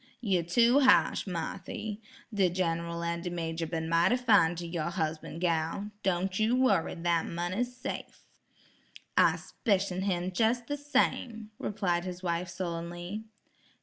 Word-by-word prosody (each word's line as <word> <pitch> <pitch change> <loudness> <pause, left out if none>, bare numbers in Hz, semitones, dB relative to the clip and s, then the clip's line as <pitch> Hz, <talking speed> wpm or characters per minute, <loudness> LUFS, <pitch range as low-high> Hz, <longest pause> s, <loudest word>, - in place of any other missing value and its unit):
"You 195 -7 +1
tew 235 - +4
ha'sh, 260 -5 +4
Marthy. 190 +4 -4 0.3
De 195 -3 +3
Gen'ral 170 -1 -1
an' 170 0 -2
de 175 - -3
major 165 -1 -3
been 160 -1 -3
mighty 170 +9 +3
fine 210 -9 +4
ter 170 0 -5
your 170 -1 -2
husban', 160 -3 -3
gal. 170 +4 -1
Don' 185 -1 +1
you 220 +5 +2
worry, 210 -10 +2
dat 170 -1 0
money's 185 +9 -2
safe." - - -6 0.9
"I - - +5
'spicion 195 -4 -1
him 185 -2 -1
jes' 230 +4 +2
the 290 +5 -4
same," 255 -6 0
replied 180 -4 -1
his 180 0 -6
wife 175 0 -1
sullenly. 175 +3 -5
180 Hz, 140 wpm, -30 LUFS, 170-215 Hz, 0.9 s, I